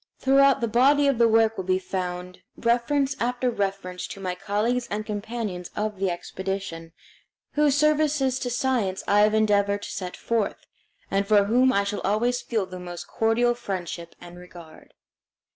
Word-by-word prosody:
Throughout 275 0 +4
the 235 - +1
body 275 +6 +4
of 275 -4 +1
the 235 - +6
work 225 0 +3
will 190 - -3
be 185 0 +1
found 180 -1 -5 0.2
reference 265 +4 +1
after 245 +1 0
reference 195 -4 -3
to - - -9
my 185 -2 -3
colleagues 215 +6 -1
and 210 +1 -3
companions 210 -4 -4
of 210 -2 -3
the 195 -1 +1
expedition, 175 -2 -5 0.6
whose 295 -2 +2
services 295 -3 +2
to 250 - -3
science 245 -6 -1
I 205 - +4
have 210 +1 +4
endeavored 205 -1 +2
to - - -6
set 180 -2 -5
forth, 225 -3 -2 0.5
and 195 0 +1
for 205 -1 +5
whom 250 +5 +3
I 200 -5 +2
shall 200 +1 -3
always 240 +5 0
feel 220 -5 -1
the 185 0 -9
most 175 -1 -8
cordial 230 +2 +2
friendship 185 -7 -6
and 175 0 -12
regard. 175 -3 -14
210 Hz, 165 wpm, -25 LUFS, 190-245 Hz, 0.6 s, the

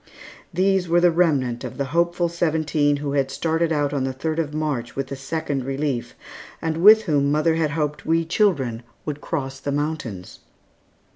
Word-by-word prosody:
These 185 0 +1
were 170 +1 +4
the 175 0 +5
remnant 145 -8 +1
of - - -7
the 140 - -1
hopeful 170 +1 +2
seventeen 155 -3 +1
who 145 0 -3
had 140 -1 +1
started 165 +4 0
out 145 -2 0
on 140 -2 0
the 135 - -1
third 155 +5 -2
of 155 -3 -1
March 150 -6 -3
with 135 -1 -3
the 140 - -4
Second 140 0 -3
Relief, 135 -1 -3 0.4
and 160 -1 -2
with 215 +5 +7
whom 145 -6 +1
mother 155 +2 +2
had 160 -1 +1
hoped 150 -1 -2
we 165 +1 +1
children 150 - +1 0.2
would 150 -1 -4
cross 135 -4 -4
the 140 - -3
mountains. 140 - -4
150 Hz, 175 wpm, -23 LUFS, 140-165 Hz, 0.4 s, with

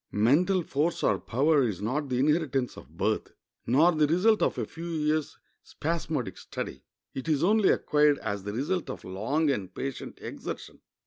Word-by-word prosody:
Mental 165 - +3
force 155 +3 -1
or - - +2
power 145 +5 +2
is 110 -8 -1
not 130 +8 -2
the 125 - 0
inheritance 140 -2 +1
of 75 +6 -14
birth, 105 +3 -1 0.3
nor 150 +9 +5
the 155 -3 +2
result 195 +8 +3
of - - +1
a - - -1
few 165 +1 -8
years' 155 -1 -1 0.2
spasmodic 155 - -3
study; - - -6 0.3
it 135 +5 -5
is 150 -1 +2
only 210 +2 +4
acquired 150 -1 +3
as 105 -5 -3
the 100 +2 -5
result 150 - -2
of 130 - -6
long 135 +12 0
and 95 -8 -4
patient 135 -1 -5
exertion. - - -7
145 Hz, 170 wpm, -28 LUFS, 120-160 Hz, 0.3 s, nor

